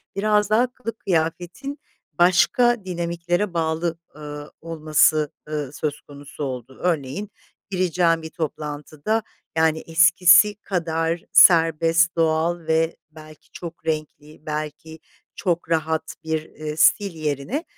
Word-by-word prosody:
biraz 210 Hz, +1 st, +2 dB
daha 235 Hz, +4 st, +3 dB
kılık 230 Hz, -3 st, -7 dB
kıyafetin 175 Hz, -, -2 dB, 0.3 s
başka 190 Hz, +7 st, +3 dB
dinamiklere 175 Hz, +1 st, -2 dB
bağlı, 165 Hz, 0 st, -1 dB, 0.2 s
ııı, 150 Hz, 0 st, -8 dB
olması, 155 Hz, -2 st, +2 dB, 0.2 s
ııı, 150 Hz, -3 st, -4 dB
söz 150 Hz, 0 st, -4 dB
konusu 145 Hz, 0 st, -10 dB
oldu. 130 Hz, -1 st, -6 dB
Örneğin 165 Hz, +3 st, -2 dB, 0.4 s
gireceğim 180 Hz, -3 st, +1 dB
bir 160 Hz, -, -7 dB
toplantıda, 155 Hz, +6 st, -3 dB, 0.3 s
yani, 160 Hz, 0 st, +3 dB
eskisi 170 Hz, +4 st, +6 dB
kadar 165 Hz, -4 st, -2 dB
serbest, 165 Hz, 0 st, +5 dB
doğal 165 Hz, +1 st, +1 dB
ve 160 Hz, +1 st, +1 dB, 0.2 s
belki 155 Hz, -1 st, -15 dB
çok 170 Hz, -1 st, -9 dB
renkli, 155 Hz, -1 st, -5 dB
belki 155 Hz, +1 st, -6 dB, 0.4 s
çok 175 Hz, -3 st, -2 dB
rahat 160 Hz, -1 st, -1 dB
bir, 160 Hz, -1 st, -2 dB
eee, 155 Hz, -1 st, -7 dB
stil 200 Hz, +3 st, +4 dB
yerine 155 Hz, -, -3 dB
165 Hz, 110 wpm, -22 LUFS, 155-175 Hz, 0.4 s, eskisi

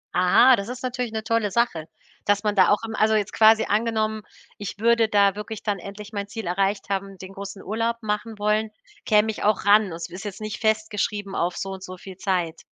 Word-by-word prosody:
Aha, 185 Hz, +8 st, +6 dB
das 200 Hz, 0 st, -5 dB
ist 250 Hz, +1 st, -7 dB
natürlich 250 Hz, -2 st, -3 dB
`ne 220 Hz, -1 st, -4 dB
tolle 230 Hz, -2 st, 0 dB
Sache, 180 Hz, -8 st, 0 dB, 0.4 s
dass 205 Hz, +1 st, +2 dB
man 210 Hz, 0 st, 0 dB
da 185 Hz, -, +5 dB
auch 205 Hz, -, +2 dB
im 220 Hz, -, -5 dB
also, 220 Hz, 0 st, +3 dB
jetzt 210 Hz, -2 st, -1 dB
quasi 220 Hz, 0 st, +6 dB
angenommen, 220 Hz, 0 st, 0 dB, 0.4 s
ich 205 Hz, -1 st, -6 dB
würde 230 Hz, +1 st, +3 dB
da 200 Hz, -2 st, +4 dB
wirklich 210 Hz, +1 st, -7 dB
dann 205 Hz, -3 st, -1 dB
endlich 205 Hz, +3 st, -9 dB
mein 200 Hz, -1 st, -3 dB
Ziel 220 Hz, +1 st, -6 dB
erreicht 195 Hz, +4 st, -1 dB
haben, 195 Hz, -1 st, -3 dB
den 190 Hz, +1 st, -10 dB
großen 195 Hz, 0 st, -8 dB
Urlaub 230 Hz, +2 st, -1 dB
machen 210 Hz, +1 st, -3 dB
wollen, 210 Hz, +1 st, +1 dB, 0.4 s
käme 215 Hz, 0 st, +3 dB
ich -, -, -7 dB
auch 210 Hz, -1 st, +1 dB
ran. 210 Hz, +1 st, +6 dB
Und 170 Hz, -, -7 dB
es 170 Hz, -, -6 dB
ist 190 Hz, +4 st, -8 dB
jetzt 205 Hz, -2 st, -6 dB
nicht 215 Hz, 0 st, -5 dB
festgeschrieben 215 Hz, -2 st, -1 dB
auf 175 Hz, +1 st, -1 dB
so 195 Hz, -, -4 dB
und 190 Hz, -1 st, -8 dB
soviel 185 Hz, 0 st, -10 dB
Zeit. 175 Hz, -4 st, -1 dB
210 Hz, 215 wpm, -24 LUFS, 195-220 Hz, 0.4 s, Aha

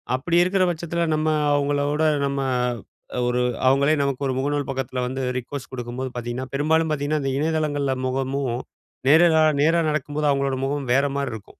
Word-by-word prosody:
அப்படி 170 Hz, +7 st, 0 dB
இருக்குற 185 Hz, +1 st, +2 dB
பட்சத்துல 170 Hz, +1 st, -2 dB
நம்ம 155 Hz, +1 st, -1 dB, 0.3 s
அவங்கள 145 Hz, 0 st, +1 dB
விட, 155 Hz, +1 st, +1 dB, 0.2 s
நம்ம 140 Hz, 0 st, -2 dB, 0.8 s
அ -, -, 0 dB
ஒரு 125 Hz, 0 st, +1 dB, 0.3 s
அவங்களே 140 Hz, +3 st, +4 dB
நமக்கு 140 Hz, -1 st, -2 dB
ஒரு 130 Hz, -, -1 dB
முகநூல் 145 Hz, +1 st, -1 dB
பக்கத்துல 130 Hz, -1 st, -3 dB
வந்து 130 Hz, +1 st, -4 dB, 0.2 s
ரிக்வஸ்ட் 130 Hz, +2 st, -8 dB
குடுக்கும்போது 125 Hz, +1 st, -4 dB
பாத்தீங்கன்னா, 120 Hz, +2 st, -5 dB
பெரும்பாலும் 155 Hz, +3 st, +1 dB
பாத்தீங்கன்னா, 145 Hz, +1 st, -1 dB
அந்த 135 Hz, -, -1 dB
இணையதளங்கள்ல 150 Hz, -3 st, 0 dB
முகமும், 135 Hz, -1 st, -1 dB, 0.5 s
நேர 160 Hz, +4 st, +7 dB
கா 160 Hz, -, +5 dB, 0.2 s
நேரா 165 Hz, +2 st, +3 dB
நடக்கும்போது 150 Hz, 0 st, -1 dB
அவங்களோட 140 Hz, -1 st, 0 dB
முகமும், 140 Hz, -1 st, -3 dB
வேற 140 Hz, +2 st, +3 dB
மாரி 140 Hz, -3 st, -2 dB
இருக்கும். 105 Hz, -3 st, -11 dB
140 Hz, 165 wpm, -23 LUFS, 130-155 Hz, 0.8 s, நேர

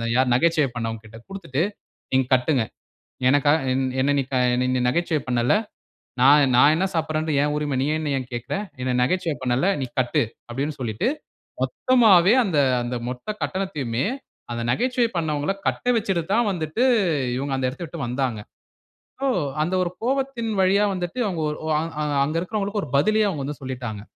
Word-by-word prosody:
யார் 130 Hz, -1 st, +3 dB
நகைச்சுவை 155 Hz, +1 st, +3 dB
பண்ணவங்ககிட்ட 115 Hz, -1 st, -5 dB
குடுத்துட்டு, 165 Hz, -7 st, -3 dB, 0.5 s
"நீங்க 130 Hz, 0 st, +3 dB
கட்டுங்க, 130 Hz, 0 st, +1 dB, 0.7 s
எனக்காக 145 Hz, +2 st, +4 dB
என்-என்ன 130 Hz, +1 st, 0 dB
நீ 135 Hz, -, -2 dB
க 130 Hz, -, +1 dB, 0.2 s
என்ன 125 Hz, +1 st, 0 dB
நீ 125 Hz, -, +1 dB
நகைச்சுவை 165 Hz, +2 st, 0 dB
பண்ணல, 120 Hz, +3 st, +2 dB, 0.7 s
நான்-நான் 140 Hz, 0 st, +6 dB
என்ன 190 Hz, +3 st, +1 dB
சாப்பறது, 155 Hz, -1 st, -1 dB
என் 150 Hz, 0 st, 0 dB
உரிமை 150 Hz, -2 st, -1 dB
நீ 140 Hz, -, 0 dB
என்ன 155 Hz, -2 st, -2 dB
ஏன் 125 Hz, -, -7 dB
கேட்குற? 120 Hz, +9 st, -3 dB, 0.3 s
என்ன 130 Hz, -, -1 dB
நகைச்சுவை 165 Hz, +2 st, 0 dB
பண்ணேல. 130 Hz, +8 st, +1 dB
நீ 130 Hz, -, -1 dB
கட்டு.", 125 Hz, -1 st, +1 dB, 0.3 s
அப்டின்னு 140 Hz, +5 st, -3 dB
சொல்லிட்டு 110 Hz, -, -1 dB, 0.5 s
மொத்தமாவே 225 Hz, -, +4 dB
அந்த, 180 Hz, -8 st, 0 dB, 0.2 s
அந்த 120 Hz, +1 st, -3 dB
மொத்த 125 Hz, 0 st, -7 dB, 0.2 s
கட்டணத்தையுமே 150 Hz, -12 st, -2 dB, 0.5 s
அந்த 120 Hz, -, -3 dB
நகைச்சுவை 245 Hz, -, +1 dB
பண்ணவங்கல 155 Hz, +1 st, -1 dB
கட்ட -, -, -2 dB
வச்சுட்டு 195 Hz, -6 st, -1 dB
தான் 235 Hz, -1 st, +2 dB
வந்துட்டு, 165 Hz, +7 st, -1 dB, 0.5 s
இவங்க 140 Hz, +1 st, -3 dB
அந்த 130 Hz, -, 0 dB
இடத்த 145 Hz, +7 st, -10 dB
விட்டு -, -, -8 dB
வந்தாங்க. 125 Hz, -3 st, -2 dB, 0.8 s
சோ -, -, +1 dB, 0.4 s
அந்த 175 Hz, +4 st, -1 dB
ஒரு 175 Hz, -, -1 dB
கோவத்தின் 260 Hz, -2 st, -1 dB
வழியா 195 Hz, +2 st, +4 dB
வந்துட்டு 180 Hz, +5 st, -4 dB
அவங்க, 175 Hz, -5 st, -2 dB, 0.6 s
அ -, -, 0 dB, 0.2 s
அங்க 155 Hz, +3 st, -2 dB
இருக்கறவங்களுக்கு, 205 Hz, +2 st, -2 dB
ஒரு -, -, -10 dB
பதிலயே 215 Hz, +7 st, +3 dB
அவுங்க 150 Hz, -8 st, -3 dB
வந்து 145 Hz, +1 st, -5 dB
சொல்லிட்டாங்க. 120 Hz, -5 st, -5 dB
150 Hz, 155 wpm, -23 LUFS, 130-185 Hz, 0.8 s, நான்-நான்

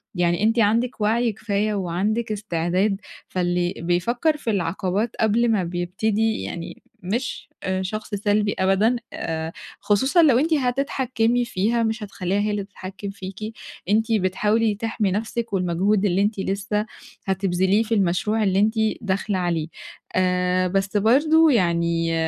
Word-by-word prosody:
يعني 175 Hz, +2 st, +1 dB
أنتِ 225 Hz, +2 st, +3 dB
عندِك 230 Hz, +3 st, +1 dB
وعي 225 Hz, +2 st, +2 dB
كفاية 210 Hz, 0 st, -1 dB
وعندِك 205 Hz, +4 st, -1 dB
استعداد، 195 Hz, 0 st, -1 dB, 0.3 s
فاللي 175 Hz, -1 st, 0 dB
بيفكّر 235 Hz, -, 0 dB
في 235 Hz, -, -4 dB
العقبات 190 Hz, +3 st, -1 dB
قبل 225 Hz, +2 st, +3 dB
ما 205 Hz, -4 st, +2 dB
بيبتدي 200 Hz, +6 st, -1 dB
يعني 170 Hz, -1 st, -7 dB, 0.2 s
مش 235 Hz, +7 st, -3 dB
آآ 190 Hz, 0 st, -1 dB
شخص 215 Hz, +2 st, -4 dB
سلبي 205 Hz, 0 st, +1 dB
أبدًا، 195 Hz, +5 st, +3 dB, 0.2 s
آآ 160 Hz, 0 st, -3 dB, 0.3 s
خصوصًا 265 Hz, -, +3 dB
لو 265 Hz, -6 st, +5 dB
أنتِ 320 Hz, +4 st, +1 dB
هتتحكمي 250 Hz, -3 st, +1 dB
فيها 230 Hz, +2 st, 0 dB
مش 220 Hz, -1 st, -1 dB
هتخلّيها 195 Hz, -1 st, -2 dB
هي 210 Hz, +1 st, 0 dB
اللي 205 Hz, -1 st, -2 dB
تتحكم 195 Hz, 0 st, -8 dB
فيكِ، 195 Hz, +3 st, -7 dB, 0.4 s
أنتِ 220 Hz, +2 st, +2 dB
بتحاولي 210 Hz, +2 st, +1 dB
تحمي 215 Hz, -2 st, -1 dB
نفسِك 225 Hz, +2 st, -3 dB
والمجهود 190 Hz, +3 st, +1 dB
اللي 190 Hz, 0 st, +2 dB
أنتِ 205 Hz, 0 st, 0 dB
لسه 200 Hz, +2 st, -1 dB, 0.4 s
هتبذليه 190 Hz, +2 st, +1 dB
في 230 Hz, +1 st, -2 dB
المشروع 205 Hz, +3 st, +1 dB
اللي 195 Hz, -1 st, +2 dB
أنتِ 215 Hz, +2 st, +3 dB, 0.3 s
داخلة 195 Hz, -1 st, -1 dB
عليه، 170 Hz, -3 st, -1 dB, 0.5 s
آآ 180 Hz, 0 st, +2 dB
بس 195 Hz, +2 st, 0 dB
برضو 305 Hz, +9 st, +4 dB
يعني 170 Hz, -6 st, +1 dB
205 Hz, 135 wpm, -23 LUFS, 185-225 Hz, 0.5 s, لو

